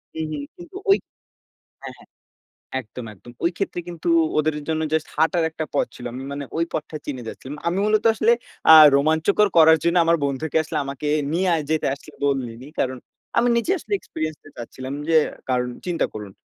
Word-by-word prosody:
হু, 160 - -3
হু। - - -3 0.2
কিন্তু 350 +1 -13
ঐ - - +8 0.9
হ্যাঁ, - - -7
হ্যাঁ - - -19 0.7
একদম, 120 +2 -9
একদম 120 +4 -14
ওই 170 - +3
ক্ষেত্রে 195 -3 -2
কিন্তু 170 -1 -7 0.3
ওদের 155 0 +1
জন্য 160 0 0
জাস্ট 160 0 0
হাঁটার 165 +1 +2
একটা 160 0 -4
পথ 140 - +2
ছিল। 125 - -10
আমি 130 +2 -6
মানে 140 0 -4
ওই 165 - +2
পথটা 155 0 -4
চিনে 130 -4 -5
যাচ্ছিলাম। 135 +5 -8
আমি 175 - 0
মূলত 215 +1 +2
আসলে 220 +2 +3 0.4
আ - - +12 0.2
রোমাঞ্চকর 160 +8 +3
করার 160 0 +8
জন্য, 170 +1 +2
আমার 170 0 +4
বন্ধুকে 140 +3 -1
আসলে 155 - -4
আমাকে 140 +2 -5 0.2
নিয়ে 185 +3 +1
আয় 155 - -2
যেতে 160 0 +1
আসলে 140 - -16
বলিনি 130 -2 -2
কারণ, 130 0 0 0.4
আমি 245 - +4
নিজে 235 +10 0
আসলে 410 - -5
এক্সপেরিয়েন্স 155 - -5
টা 145 - -12
চাচ্ছিলাম, 130 +3 -7 0.2
যে 165 - +3 0.3
কারন 125 -1 +1 0.2
চিন্তা 175 -2 0
করুন 105 -2 -7
155 Hz, 185 wpm, -22 LUFS, 135-170 Hz, 0.9 s, আ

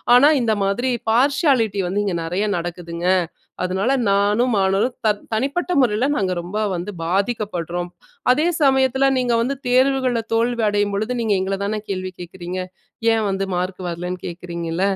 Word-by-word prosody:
ஆனா 275 +4 +7
இந்த 225 -2 +1
மாதிரி 240 +7 0 0.2
பார்சியாலிட்டி 255 - +2
வந்து 195 +3 0
இங்க 190 -3 -1
நெறையா 185 +6 -1
நடக்குதுங்க. 170 0 -4 0.6
அதனால, 190 +6 0 0.2
நானும் 210 +5 +2
மாணவர்களும் 195 +6 +1
த - - +5 0.2
தனிப்பட்ட 280 +10 -1
முறைல 235 +1 +2
நாங்க 190 -6 0
ரொம்ப 180 +5 -5 0.2
வந்து 175 +4 -4
பாதிக்கப்படுறோம். 180 -3 -2 0.4
அதே 305 +6 +2
சமயத்துல 265 -1 +3
நீங்க 245 -2 +1
வந்து 265 +4 -1
தேர்வுகள்ல 255 -1 +2
தோல்வி 235 0 +1
அடையும் 205 -1 0
பொழுது, 215 +4 -1
நீங்க 215 -3 +2
எங்களதான 200 +2 -2
கேள்வி 185 -1 -3
கேக்குறீங்க? 180 +1 -6 0.5
ஏன் 225 -1 +1
வந்து 195 0 -1
மார்க் 180 +1 -2
வரலன்னு 175 +1 -4
கேக்குறீங்கள? 170 0 -4
205 Hz, 140 wpm, -21 LUFS, 180-245 Hz, 0.6 s, ஆனா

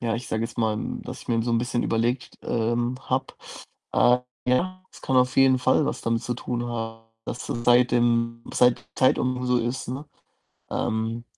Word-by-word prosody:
ja, 115 -2 0
ich 120 +1 -5
sage 110 - -1
jetzt 120 - -7
mal, 110 -2 +1 0.2
dass - - -8
ich - - -20
mir 115 -1 +2
so 120 - -1
'n 115 - +3
bisschen 120 0 -1
überlegt 120 +3 -1
t - - -14
ähm, 120 +2 0
habe. 130 +1 -2 0.6
Äh, 125 0 +5 0.3
ja, 185 +9 +1
es - - -15
kann 130 - +1
auf 125 0 +3
jeden 135 -1 +5
Fall 130 +4 +3
was - - -2
damit 115 0 0
zu 120 +1 -2
tun 120 0 -3
haben, 115 -1 -5 0.2
dass 120 - -5
seit 120 +1 +3
dem 115 -1 +1
seit 125 -1 +3
Zeit 130 - +3
um 125 0 -1
so 125 0 +3
ist, 120 +2 -3
ne? 135 +4 -5 0.7
Ähm, 110 +1 -1
120 Hz, 195 wpm, -25 LUFS, 115-125 Hz, 0.7 s, Äh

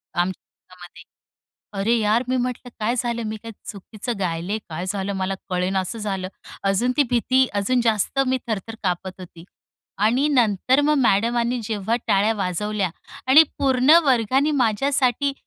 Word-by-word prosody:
आमच्यातामध्ये. 180 -1 -6 0.8
"अरे 225 +4 +2
यार," 220 +3 +2
मी 255 - +1
म्हटलं, 250 0 -3
"काय 225 +3 0
झालं? 235 -1 -2
मी 215 0 -4
काय 230 - -8 0.2
चुकीचं 215 +2 -7
गायले? 180 +3 -2
काय 170 +2 -5
झालं," 200 0 -2
मला 190 0 -2 0.2
कळेनासं 185 +4 -1
झालं. 195 -3 -3 0.4
अजून 195 +6 +1
ती 290 - +5
भीती 255 +2 +3
अजून 250 +5 +1
जास्त 220 +3 0
मी 260 0 +1
थर-थर 220 +1 -4
कापत 185 0 -3
होती. 170 -1 -12 0.6
आणि 250 +7 +3
नंतर 250 -1 +2
मग 300 +1 +2
मॅडमानी 235 +2 +1
जेव्हा 215 +1 -1
टाळ्या 205 +3 +3
वाजवल्या 200 +1 -2 0.4
आणि 295 +4 +9 0.2
पूर्ण 260 0 +2
वर्गाने 265 +2 +2
माझ्यासाठी 260 +4 +1
220 Hz, 140 wpm, -22 LUFS, 195-250 Hz, 0.8 s, आणि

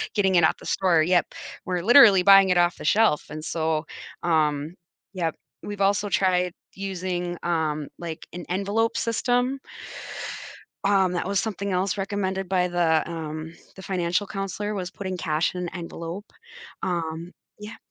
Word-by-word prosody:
getting 190 -3 +3
it 170 - +5
off - - +2
the - - -13
store, 170 -5 +3
yep. 175 +1 +3 0.4
We're 180 -1 -1
literally 220 -5 +8
buying 195 0 +8
it 180 - +3
off 175 0 +2
the - - -8
shelf. 210 -4 +3
And 155 +1 -7
so, 160 -1 -1 0.4
um, 155 -1 +1 0.4
yep. 170 -4 -2 0.3
We've 205 -1 -6
also 200 +1 +2
tried 180 -2 +2 0.2
using, 180 -2 -3
um, 155 -3 -1
like, 165 -2 -6
an 175 0 -7
envelope 200 +5 0
system 245 +3 0 1.2
um, 195 -2 +3
that 175 - -2
was 200 0 0
something 200 -2 -3
else 185 +2 0
recommended 195 -2 -2
by 180 -1 +2
the, 170 -3 +2
um, 160 0 -6 0.2
the 190 - -10
financial 180 +1 -1
counselor, 200 +1 -4
was 185 -2 -4
putting 185 -1 -5
cash 160 +1 0
in 180 - -4
an 175 - -3
envelope. 170 +3 -7 0.5
Um, 170 -1 -3 0.3
yeah 210 +2 -8
180 Hz, 155 wpm, -25 LUFS, 170-195 Hz, 1.2 s, literally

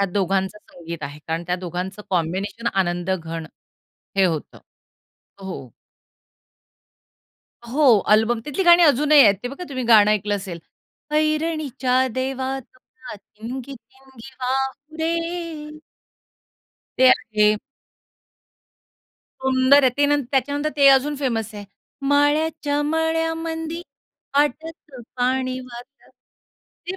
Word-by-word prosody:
या - - +3
दोघांचं 195 +1 0
संगीत 170 -5 -10
आहे. 145 +1 -6
कारण 165 +1 -2
त्या 180 +1 0
दोघांचं 185 +3 -5
कॉम्बिनेशन 190 +6 -2
आनंदघण 175 -3 -2 0.7
हे 195 - +4
होतं. 165 -5 -2 0.8
हो. 180 - -8 2.0
हो, 260 -3 +5
अल्बम. 220 +2 +3
तिथली 300 +6 -2
गाणी 345 0 +7
अजूनही 295 -1 +5
आहेत, 205 -4 +6
ते 245 - -3
बघा 280 +7 -8
तुम्ही 255 -3 -4
गाणं 215 -3 +6
ऐकलं 205 0 0
असेल, 190 -4 -7 0.6
ऐरणीच्या 305 -5 +1
देवा 260 +1 -2
तुला 260 +4 -14
ठिणगी 240 +6 -9
ठिणगी 265 +1 -16
वाहू 265 +4 -3
दे. 330 -2 -4 1.2
ते 260 0 +7
आहे. 215 -3 +3 1.9
सुंदर 265 +2 +4
आहे. 260 - +5
ते 285 0 +3
न 290 0 +2
त्याच्यानंतर 285 +3 0
ते 280 -1 +5
अजून 275 +2 +4
फेमस 225 -6 -2
आहे. 205 -1 -8 0.4
माळ्याच्या 290 0 +1
मळ्यामंदी 325 +1 -2 0.5
पाटाचं 295 -2 -2
पानी 255 +1 0
जातं. 250 +2 -13 0.8
ती 375 - -4
260 Hz, 105 wpm, -22 LUFS, 210-295 Hz, 2.0 s, गाणी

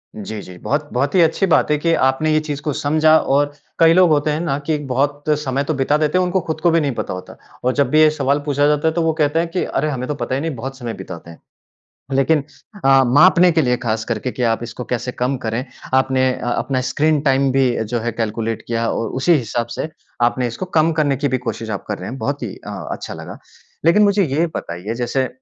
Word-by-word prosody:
जी, 105 0 -6
जी। 90 -2 -11
बहुत, 145 - -2
बहुत 140 +3 0
ही 180 - +6
अच्छी 165 +4 +3
बात 170 - +3
है 150 - +3
कि 165 +3 +1
आपने 135 +4 +1
ये 155 - +4
चीज़ 150 -2 -5
को 150 - -2
समझा। 155 +3 +3
और 145 0 +1 0.3
कई 165 0 +6
लोग 180 0 +5
होते 150 0 +2
हैं 150 - -1
ना 140 -5 -1
कि 155 0 +1
बहुत 140 +3 -1 0.2
समय 140 -1 -1
तो 155 - -1
बिता 140 +1 +1
देते 155 +3 +1
हैं, 185 - +3
उनको 180 +1 +1
ख़ुद 160 -1 -3
को 170 - +3
भी 165 - +3
नहीं 145 - 0
पता - - -3
होता, 90 - -9 0.3
और 125 +1 +1
जब 140 -2 +1
भी 155 +3 +4
ये 155 - +7
सवाल 140 -1 0
पूछा 145 0 +2
जाता 150 +1 +2
है 160 - +2
तो 170 - 0
वो 160 -1 +1
कहते 150 +2 +2
हैं 170 - 0
कि, 180 +2 -1
"अरे, 155 +3 -1
हमें 130 -3 -3
तो 150 - -2
पता 130 -1 -3
ही 135 - -2
नहीं, 160 -2 -3
बहुत 135 +3 -6
समय 120 -3 -5
बिताते 90 -4 -9
हैं"। 80 - -15 0.7
लेकिन 135 +3 +2 0.4
अ, 135 0 +6
मापने 175 +7 +6
के 160 -1 +2
लिए 125 -1 +2
ख़ास 110 -1 -1
करके 115 +2 -3
कि 125 - -5
आप 115 - -3
इसको 120 +1 -6
कैसे 125 +1 -3
कम 125 +2 -1
करें, 115 +3 -2 0.3
आपने 130 0 +3
अ, - - -6
अपना 130 +1 -1
स्क्रीन 155 0 +2
टाइम 135 0 +3
भी 135 -1 +3 0.2
जो 120 +3 -2
है 120 +1 -2
कैलकुलेट 115 0 -3
किया 115 0 -1
और 115 - -2
उसी 175 +6 +4
हिसाब 120 -4 -1
से - - -3 0.3
आपने 120 +1 +2
इसको 120 +10 -5
कम 160 +1 +3
करने 150 -3 +1
की 145 +2 -1
भी 130 0 0
कोशिश 115 -1 -4
आप 100 - -4
कर 105 - -3
रहे 90 - -6
हैं, 130 - -6
बहुत 140 +1 -3
ही 110 -5 -4
अ, - - -10 0.2
अच्छा - - -6
लगा। - - -9 0.5
लेकिन 170 +6 +5
मुझे 200 -1 +3
ये 155 +3 0
बताइए, 90 +6 -5
जैसे 125 +2 -1
140 Hz, 250 wpm, -19 LUFS, 120-155 Hz, 0.7 s, ये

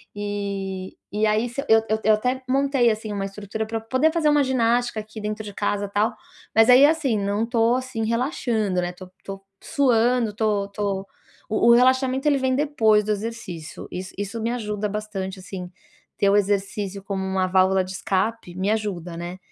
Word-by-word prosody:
e 200 -2 -4 0.2
e 210 +1 +1
aí 215 +3 +1
se 240 +4 -4
eu 220 0 +6
eu 220 0 +1
eu 220 - +5
até 250 +4 -1
montei 270 -2 +3
assim 215 0 -4
uma 200 -1 -2
estrutura 210 +2 -5
para 225 0 -3
poder 260 +8 +2
fazer 325 -3 +2
uma 295 -1 +4
ginástica 240 -2 +1
aqui 215 +1 -10
dentro 210 +1 -4
de 205 -1 -8
casa, 205 0 -1
tal, 210 +3 +1 0.4
mas 225 +1 +6
aí 255 +3 +9
assim, 295 -7 +2
não 200 +2 0
estou 230 0 +2
assim 255 -3 -3
relaxando, 230 - 0
né, 175 0 -2
estou 185 +1 -12
estou 195 0 -8 0.2
suando, 245 -3 +2
estou 210 -1 0
estou, 200 -1 -3 0.4
o 220 +2 +3
o - - +9
relaxamento 260 +2 +3
ele 290 -2 +4
vem 260 -1 +1
depois 225 -7 +3
do 215 - -1
exercício, 205 -7 -5
is 185 +1 -6
isso 205 +3 -4
me 230 +2 -1
ajuda 210 -3 -2
bastante, 200 -2 -5
assim, 185 -1 -7 0.5
ter 200 -2 +3
o 200 - +4
exercício 200 -1 -1
como 195 -1 -3
uma 190 -1 0
válvula 190 0 +3
de 185 - -8
escape 190 0 -2
me 190 +3 0
ajuda, 185 -6 -3
né, 175 +2 -6
215 Hz, 185 wpm, -23 LUFS, 195-240 Hz, 0.5 s, aí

